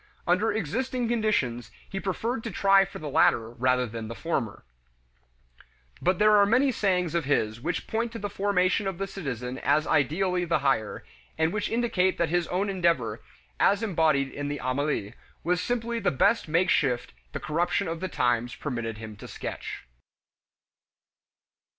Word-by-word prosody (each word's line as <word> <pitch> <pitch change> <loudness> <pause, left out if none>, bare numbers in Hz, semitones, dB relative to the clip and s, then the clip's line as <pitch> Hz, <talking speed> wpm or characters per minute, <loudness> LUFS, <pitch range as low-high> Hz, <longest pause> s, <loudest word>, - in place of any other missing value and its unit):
Under 185 +5 +2
existing 245 - -2
conditions, 210 - 0 0.2
he 195 - -4
preferred 225 +5 -2
to - - -2
try 195 0 +4
for 195 - -9
the 155 - -6
latter 115 -4 +3
rather 125 +1 +1
than 115 -1 -6
for - - -7
the - - -14
former. 120 -11 -2 1.4
But 180 0 +2
there 215 +1 +5
are 200 - +6
many 255 +5 +3
sayings 180 -7 0
of 170 -3 0
his 115 -5 0
which 170 +5 -2
point 230 +1 -2
to - - -4
the 205 - -3
formation 195 -1 +1
of 190 -3 -3
the 195 - -2
citizen 130 - -5
as 150 +2 +2
ideally 180 +5 +1
the 170 -1 +1
higher, 110 -6 0 0.3
and 160 +1 +1
which 210 -1 -1
indicate 215 -6 +1
that 170 - +1
his 175 0 +1
own 190 +3 -1
endeavor, 170 - 0 0.4
as 200 +2 +3
embodied 155 -9 +2
in 145 0 -4
the 145 0 -3
Emile, 130 -5 -1 0.3
was 180 +2 +1
simply 235 -1 -1
the - - +2
best 200 - +2
makeshift 155 -7 +1 0.2
the - - -4
corruption 175 +5 0
of 165 0 -3
the 185 - -2
times 120 -4 0
permitted 120 -6 -4
him 110 -1 -8
to - - -10
sketch. - - -6
170 Hz, 165 wpm, -27 LUFS, 130-200 Hz, 1.4 s, are